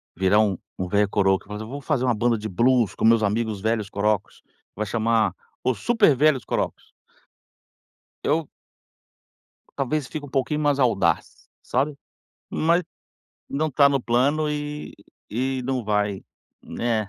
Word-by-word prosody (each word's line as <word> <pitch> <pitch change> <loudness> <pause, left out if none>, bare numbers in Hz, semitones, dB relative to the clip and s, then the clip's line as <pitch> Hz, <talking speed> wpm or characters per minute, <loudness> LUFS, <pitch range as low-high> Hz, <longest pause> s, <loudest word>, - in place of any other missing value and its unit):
virar 95 +3 +3
um 100 -4 +2 0.2
um 95 - -2
velho 105 +2 +2
coroco, 95 -1 +1
mas 105 +1 -6
eu 110 - -7
vou 140 +5 -6
fazer 140 -2 -1
uma 120 -2 +2
banda 120 +2 +2
de 110 +1 -5
blues 115 +1 +2
com - - -1
meus 115 0 +5
amigos 105 0 -1
velhos 110 -1 0
corocos, 105 0 -1 0.3
vai 110 - -2
chamar, 110 -1 +1 0.3
Os 130 -1 +1
Super 225 - +4
Velhos 140 -2 +3
Corocos. - - -3 1.3
Eu 155 +1 0 1.3
Talvez, 140 0 -1
fique 145 0 -6
pouquinho 140 +2 0
mais 145 -2 +1
audaz, 95 - +1 0.3
sabe. 140 +4 -1 0.5
Mas 170 +3 +2 0.7
não 155 +3 -1
está 140 0 +5
no 140 -1 +1
plano 140 +6 +1
e 150 0 -5 0.4
e 130 +3 -1
não 130 0 -1
vai, 105 -2 0 0.4
né. 110 -3 -2
120 Hz, 145 wpm, -24 LUFS, 105-140 Hz, 1.3 s, meus